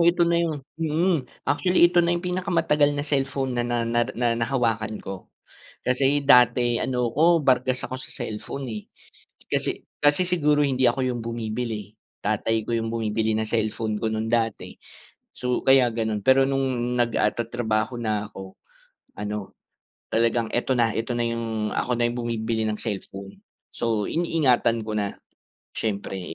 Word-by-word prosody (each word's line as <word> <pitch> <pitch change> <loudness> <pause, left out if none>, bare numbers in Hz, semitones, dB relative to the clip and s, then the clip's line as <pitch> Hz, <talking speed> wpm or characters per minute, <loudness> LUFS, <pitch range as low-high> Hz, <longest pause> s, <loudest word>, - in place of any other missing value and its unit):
ito 170 +1 +4
na 170 0 +2
yung 155 -5 -2 0.2
mm, 160 -3 +1 0.2
actually 180 +4 +3
ito 175 0 +3
na 170 0 +2
yung 175 - -6
pinakamatagal 165 -5 +2
na 145 - -2
cellphone 135 -2 -1
na 120 - 0
na 120 -1 -1
nar 120 0 +1
na 120 -1 +1
nahawakan 115 -3 0
ko. 95 -1 -8 0.6
Kasi 135 +3 +2
dati 125 -3 +5
ano 125 -2 0
ko 165 +5 +4
bargas 130 -1 +2
ako 130 - -4
sa 130 - -9
cellphone, 120 +3 -5
eh. 105 - -6 0.7
Kasi - - -1 0.2
kasi 145 +5 +4
siguro 150 -4 +2
hindi 130 -1 0
ako 120 +2 +3
yung 120 -2 -2
bumibili. 110 -2 -4 0.3
Tatay 110 +1 0
ko 120 - -1
yung 115 0 -2
bumibili 110 -1 0
ng 110 - -1
cellphone 110 -1 -1
ko 110 - +1
nung 110 0 -2
dati. 115 -2 -1 0.6
So, 125 -1 -2
kaya 135 -1 +6
ganun 110 -2 -1
pero 130 +1 +6
nung 130 -3 -1
nag 120 -1 +1
ah, 105 - +3
tatrabaho 115 0 -1
na 110 -3 -1
ako 95 -2 -11 0.6
ano, 105 -1 -5 0.6
talagang 115 0 +2
ito 120 +2 0
na, 115 -2 +2
ito 115 +2 -2
na 120 - +1
yung 115 -2 -2
ako 125 -1 0
na 120 - +2
yung 120 - -4
bumibili 115 -1 -1
ng 105 - -2
cellphone. 100 -2 -6 0.3
So, 110 -3 0
iniingatan 130 -9 +1
ko 110 - -3
na 100 -1 -2 0.6
siyempre. 95 -5 -3
120 Hz, 160 wpm, -24 LUFS, 110-135 Hz, 0.7 s, kaya